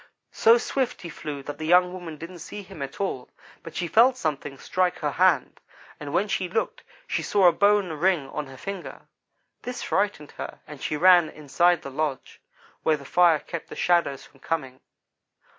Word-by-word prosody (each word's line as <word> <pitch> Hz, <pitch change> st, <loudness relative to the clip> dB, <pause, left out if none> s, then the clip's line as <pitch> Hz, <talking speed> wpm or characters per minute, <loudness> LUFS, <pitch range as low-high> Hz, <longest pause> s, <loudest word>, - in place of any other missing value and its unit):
So 230 Hz, +2 st, +5 dB
swift 255 Hz, -1 st, -2 dB
he 170 Hz, -, -6 dB
flew 145 Hz, -4 st, -6 dB
that 145 Hz, +1 st, -7 dB
the 155 Hz, -, -4 dB
young 180 Hz, +1 st, +5 dB
woman 175 Hz, -4 st, -7 dB
didn't 170 Hz, +3 st, -9 dB
see 205 Hz, +5 st, -8 dB
him 165 Hz, -5 st, -11 dB
at 140 Hz, +3 st, -6 dB
all, 160 Hz, -10 st, -3 dB, 0.3 s
but -, -, -11 dB
she 175 Hz, -, -1 dB
felt 245 Hz, +8 st, +5 dB
something 145 Hz, -, -3 dB
strike 180 Hz, +3 st, 0 dB
her -, -, -2 dB
hand, -, -, +2 dB, 0.4 s
and 145 Hz, -1 st, -6 dB
when 185 Hz, +6 st, +1 dB
she 185 Hz, -2 st, -1 dB
looked 220 Hz, +5 st, -2 dB, 0.2 s
she -, -, -2 dB
saw 200 Hz, -2 st, +2 dB
a -, -, +7 dB
bone 200 Hz, -2 st, +3 dB
ring 160 Hz, -2 st, +1 dB
on 150 Hz, 0 st, -5 dB
her 135 Hz, 0 st, -12 dB
finger. 195 Hz, +4 st, -7 dB, 0.6 s
This 250 Hz, 0 st, -5 dB
frightened 195 Hz, -7 st, -1 dB
her, -, -, -6 dB
and 150 Hz, -2 st, -11 dB
she 150 Hz, -, -2 dB
ran 175 Hz, -1 st, +6 dB
inside 170 Hz, +4 st, +1 dB
the 140 Hz, -, -7 dB
lodge, 145 Hz, -1 st, -3 dB, 0.4 s
where 155 Hz, -1 st, +2 dB
the 140 Hz, -, -13 dB
fire 175 Hz, +1 st, +4 dB
kept 165 Hz, +2 st, -7 dB
the -, -, -8 dB
shadows 170 Hz, -6 st, +1 dB
from 135 Hz, -, -21 dB
coming. 135 Hz, -5 st, -3 dB
170 Hz, 190 wpm, -25 LUFS, 150-185 Hz, 0.6 s, a